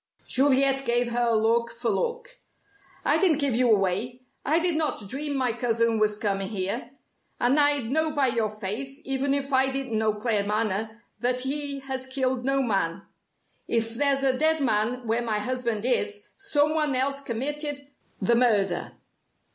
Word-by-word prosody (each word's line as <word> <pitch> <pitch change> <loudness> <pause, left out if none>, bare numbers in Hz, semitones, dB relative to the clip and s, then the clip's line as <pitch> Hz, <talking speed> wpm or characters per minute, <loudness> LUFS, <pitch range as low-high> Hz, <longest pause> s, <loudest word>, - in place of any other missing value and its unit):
Juliet 270 0 +3
gave 240 -1 +1
her 240 0 +1
look 230 +1 +2
for 235 0 -4
look. - - -3 0.7
"I - - +3
didn't 355 -7 +3
give 280 -4 +2
you 250 0 +2
away. 210 +5 +1 0.2
I 310 +3 +2
did 340 -1 +2
not 305 -9 -1
dream 285 +6 -1
my 255 -3 +1
cousin 230 -1 0
was 210 -1 +2
coming 195 -2 -1
here! 195 +3 -2 0.5
And 255 +5 +3
I'd 290 -5 +2
know 315 +2 +1
by 285 -4 +1
your 230 -2 0
face, 215 +7 -4
even 270 +1 +1
if 280 0 -3
I 265 0 +4
didn't 265 -3 -3
know 215 0 +1
Claremanagh, 215 0 -1 0.2
that 250 +1 0
he 280 +1 0
has 265 -1 -3
killed 260 -1 -1
no 275 0 +1
man. 195 -5 -1 0.6
If 225 -1 0
there's 275 +2 +2
a 265 -1 +2
dead 315 +3 +2
man 240 0 0
where 230 +2 0
my 225 -3 -1
husband 235 -1 -2
is, 420 - -1
someone 305 -6 +1
else 275 +2 0
committed 285 +4 -3 0.4
the 220 +4 +2
murder." 225 -5 +1
255 Hz, 160 wpm, -25 LUFS, 225-280 Hz, 0.7 s, I